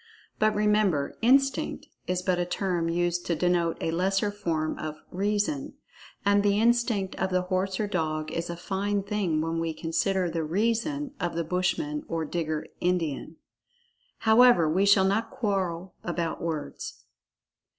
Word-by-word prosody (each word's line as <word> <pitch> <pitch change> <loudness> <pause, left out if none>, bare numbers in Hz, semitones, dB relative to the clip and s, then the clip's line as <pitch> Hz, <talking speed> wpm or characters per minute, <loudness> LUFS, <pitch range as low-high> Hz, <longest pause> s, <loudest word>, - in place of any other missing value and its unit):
But, 215 0 +3
remember, 210 -8 +2
"Instinct" 270 +3 +2 0.2
is 180 0 -1
but 180 -1 +1
a - - +2
term 180 -3 -1
used 175 +1 0
to 170 - +1
denote 170 0 +1
a 165 - -1
lesser 195 +4 +1
form 165 -6 -2
of 155 -1 -4 0.2
"Reason"—and 205 0 -1
the 205 0 +2
"Instinct" 230 -4 +2
of 190 - 0
the 185 -1 +1
horse 185 +1 -1
or 215 - +1
dog 155 -5 -2
is 170 +1 -3
a 170 - -4
fine 200 +3 -1
thing 195 -6 0
when 165 +1 -1
we 165 -1 -2
consider 175 +4 0
the 165 -1 -2
"Reason" 230 - 0
of 175 -1 -2
the 170 - 0
Bushman 190 - -1
or 165 -1 -2
Digger 155 -1 -2 0.2
In[Pg 180 +1 +2
36]dian. 155 0 -5 0.8
However, 220 -6 +6
we 185 +6 +2
shall 200 -1 +6
not 210 +4 +1
quarrel 190 -5 -2
about 170 -1 -2
words. 160 -3 -5
185 Hz, 150 wpm, -27 LUFS, 165-205 Hz, 0.8 s, However